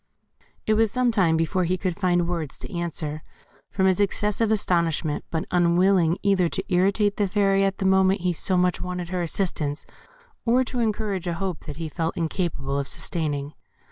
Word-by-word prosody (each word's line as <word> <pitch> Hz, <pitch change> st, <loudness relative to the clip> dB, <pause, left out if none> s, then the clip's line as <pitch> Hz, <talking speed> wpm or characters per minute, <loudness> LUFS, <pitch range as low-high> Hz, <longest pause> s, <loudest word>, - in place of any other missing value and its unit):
It 215 Hz, -, +2 dB
was 220 Hz, 0 st, +3 dB
some 250 Hz, +2 st, +1 dB
time 180 Hz, -7 st, +2 dB
before 170 Hz, +3 st, 0 dB
he 185 Hz, +2 st, 0 dB
could 180 Hz, -1 st, -2 dB
find 175 Hz, -3 st, +1 dB
words 165 Hz, -5 st, -4 dB
to -, -, -9 dB
answer, 160 Hz, -3 st, -3 dB, 0.5 s
from 190 Hz, -, 0 dB
his 190 Hz, 0 st, +3 dB
excessive 210 Hz, +2 st, +1 dB
astonishment; 170 Hz, -7 st, 0 dB
but 160 Hz, -1 st, -2 dB
unwilling 175 Hz, 0 st, +3 dB
either 195 Hz, -3 st, +3 dB
to 190 Hz, +1 st, -4 dB
irritate 200 Hz, +3 st, +2 dB
the 205 Hz, -, +1 dB
Fairy 195 Hz, 0 st, +2 dB
at 195 Hz, 0 st, 0 dB
the 195 Hz, -, -3 dB
moment 190 Hz, 0 st, +3 dB
he 180 Hz, 0 st, +1 dB
so 185 Hz, +3 st, +1 dB
much 180 Hz, 0 st, +1 dB
wanted 180 Hz, -1 st, -4 dB
her 180 Hz, -1 st, -2 dB
assistance, 165 Hz, -4 st, -2 dB, 0.6 s
or 245 Hz, +2 st, +3 dB
to 250 Hz, 0 st, -4 dB
encourage 210 Hz, -5 st, -1 dB
a 170 Hz, -, -1 dB
hope 185 Hz, -1 st, -4 dB
that 150 Hz, -1 st, -7 dB
he 165 Hz, -1 st, -4 dB
felt 165 Hz, +3 st, -3 dB
incapable 160 Hz, -5 st, -2 dB
of 140 Hz, -, -3 dB
sustaining. 145 Hz, -3 st, -3 dB
180 Hz, 180 wpm, -24 LUFS, 165-195 Hz, 0.6 s, was